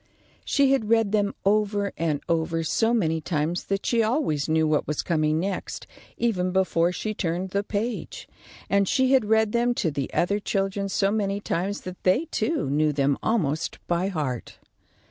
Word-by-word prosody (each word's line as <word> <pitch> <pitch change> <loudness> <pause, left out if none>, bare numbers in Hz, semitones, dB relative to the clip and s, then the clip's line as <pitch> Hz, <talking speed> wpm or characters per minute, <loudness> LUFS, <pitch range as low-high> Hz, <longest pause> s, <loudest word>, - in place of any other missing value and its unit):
She 280 -1 +3
had 225 -6 +1
read 225 -3 +3
them 205 -1 +1
over 205 0 +1
and 155 -3 -1
over 165 -1 0
so 225 +8 +1
many 165 -9 +1
times 160 +2 -2
that 195 0 -2
she 235 -1 +2
always 215 - 0
knew 160 0 +3
what 155 -1 +1
was 150 - -2
coming 155 -1 +1
next, 190 +2 -4 0.3
even 190 -6 0
before 180 -2 +2
she 215 +4 -3
turned 180 -1 -2
the 200 - +1
page; 215 +3 -4 0.4
and 200 -1 +2
she 260 +4 +2
had 260 -5 +4
read 220 0 +3
them 240 +1 +1
to 165 - 0
the 140 -2 -3
other 200 +4 +1
children 195 -1 -1
so 195 0 +1
many 200 -2 0
times 200 +1 -2
that 185 0 -8
they, 220 - +2
too, 320 - 0
knew 150 +2 +2
them 140 -1 +1
almost 160 -10 0
by 175 +2 0
heart. 145 - -4
195 Hz, 175 wpm, -25 LUFS, 160-215 Hz, 0.4 s, had